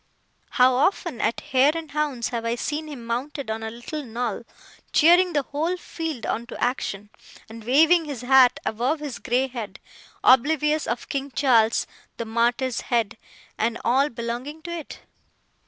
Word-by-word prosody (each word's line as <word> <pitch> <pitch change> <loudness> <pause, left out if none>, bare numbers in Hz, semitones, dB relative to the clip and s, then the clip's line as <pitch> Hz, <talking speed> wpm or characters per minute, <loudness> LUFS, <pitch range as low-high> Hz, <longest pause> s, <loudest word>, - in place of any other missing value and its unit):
How 255 0 +6
often, 285 - 0
at 225 - 0
hare 270 +3 +3
and 320 -2 -7
hounds, 285 -6 -1
have 235 -2 -3
I 230 +1 0
seen 305 +5 -3
him 270 -6 -8
mounted 255 +2 -3
on 220 0 -4
a 220 - -4
little 240 +7 -6
knoll, 235 -2 -4 0.5
cheering 350 +3 +5
the 290 -2 +1
whole 320 +7 -2
field 320 -8 -5
on 235 +1 -2
to - - -8
action, 210 -4 -2 0.4
and 225 0 -11
waving 320 +8 +4
his 280 -6 -6
hat 255 -1 +5
above 250 +8 0
his 290 -4 -6
grey 255 +1 +1
head, 235 -5 -7 0.4
oblivious 300 +4 +3
of 235 - -3
King 275 0 -3
Charles 235 -5 +3 0.3
the 230 - -4
Martyr's 235 +2 0
head, 230 -4 0 0.4
and 230 +1 0
all 270 +5 +3
belonging 240 +6 -5
to 345 - -6
it! 335 -3 -7
255 Hz, 160 wpm, -24 LUFS, 235-300 Hz, 0.5 s, How